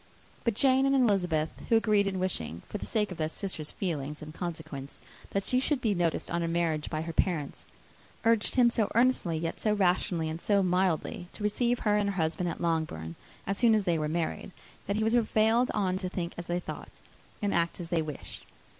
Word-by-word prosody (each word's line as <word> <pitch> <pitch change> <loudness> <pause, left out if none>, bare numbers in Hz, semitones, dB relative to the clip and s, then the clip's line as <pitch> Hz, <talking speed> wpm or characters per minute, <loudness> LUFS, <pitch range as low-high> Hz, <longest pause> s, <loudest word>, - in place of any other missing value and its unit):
But 235 -3 +1
Jane 265 +2 +4
and 275 - +3
Elizabeth, 180 - +2 0.2
who 230 - +5
agreed 210 -3 +3
in 190 -1 -1
wishing, 85 - -2
for 210 - -5
the - - -6
sake 210 -3 0
of 180 - -7
their 155 0 0
sister's 160 -4 -4
feelings 150 -5 -4
and 155 0 -9
consequence, 160 -5 -6 0.3
that 195 - -1
she 255 - +3
should 275 +1 +1
be 225 -5 +1
noticed 170 -3 -1
on 170 0 0
her 165 - 0
marriage 165 -3 0
by 155 -1 -2
her 165 0 -5
parents, 160 -5 -1 0.6
urged 225 -2 +3
him 245 -2 +5
so 220 -3 0
earnestly, 235 -9 +3
yet 165 +1 -3
so 215 - +1
rationally 180 -4 +1
and 160 +2 -4
so 200 -2 +3
mildly, 180 -1 0
to - - -8
receive 235 +3 +1
her 210 -1 +3
and 205 -1 +1
her 200 - -3
husband 170 +1 0
at 165 - -5
Longbourn, 160 - -1 0.3
as 195 +1 -2
soon 230 -2 +5
as 215 - +2
they 170 -4 +1
were 150 0 -1
married, 165 +3 -2 0.4
that 200 - 0
he 220 - +1
was 220 +1 +2
prevailed 230 +1 +3
on 190 -3 0
to 185 -2 -3
think 180 -2 -4
as 170 - -6
they 175 +1 0
thought, - - -8 0.4
and 205 -2 0
act 170 +1 0
as 170 -2 -6
they 170 -2 +1
wished. 150 -2 -7
180 Hz, 215 wpm, -29 LUFS, 165-210 Hz, 0.6 s, who